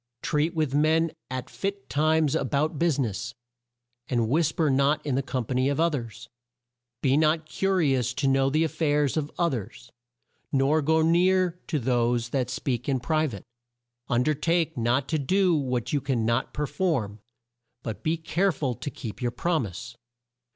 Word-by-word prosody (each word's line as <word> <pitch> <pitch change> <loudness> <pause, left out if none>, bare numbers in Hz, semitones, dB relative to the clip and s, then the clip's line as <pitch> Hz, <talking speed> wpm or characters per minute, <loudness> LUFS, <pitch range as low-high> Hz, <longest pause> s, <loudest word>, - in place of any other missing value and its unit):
"Treat 155 +3 0
with 155 -4 0
men 160 +2 +3 0.2
at 130 0 -4
fit 200 0 -4
times 155 0 +2
a - - +1
bout 145 +3 -1
bus 165 -4 +2
i 140 - +2
ness; 115 +2 -4 0.7
and 120 -3 0
whis 155 +5 +2
per 160 -1 0
not 140 +2 +2
in 145 - -1
the 135 - +1
com 130 -2 -3
pa 130 - -3
ny 130 +1 +2
of 140 +2 0
o 170 +1 +4
thers. 115 -6 -6 0.8
"Be 135 0 +3
not 155 +1 +2
cu 195 +4 -1
ri 165 -8 +3
ous 125 -1 0
to 140 0 0
know 135 0 +3
the 155 +3 +2
af 160 - -1
fairs 150 -3 +1
of 150 -2 -1
o 170 - +2
thers, 120 - -6 0.6
nor 140 +3 +3
go 160 +2 +2
near 180 +1 +3
to 160 - -1
those 120 -2 +1
that 125 -1 -1
speak 130 -2 -2
in 135 -2 +1
pri 155 +6 +1
vate. 100 -8 -7 0.7
"Un 120 +1 +2
der 155 - +2
take 165 +2 0
not 120 +3 +1
to 155 - 0
do 185 +6 +2
what 130 -4 -2
you 145 - +1
can 130 -5 -1
not 115 +3 0
per 150 - -2
form, 135 - -1 0.6
but 110 -2 -5
be 160 +1 0
care 175 +4 +1
ful 135 -8 -2
to 145 - -6
keep 115 -5 -8
your 120 - +1
prom 160 -1 -1
ise. 100 +6 -9
145 Hz, 195 wpm, -26 LUFS, 125-160 Hz, 0.8 s, o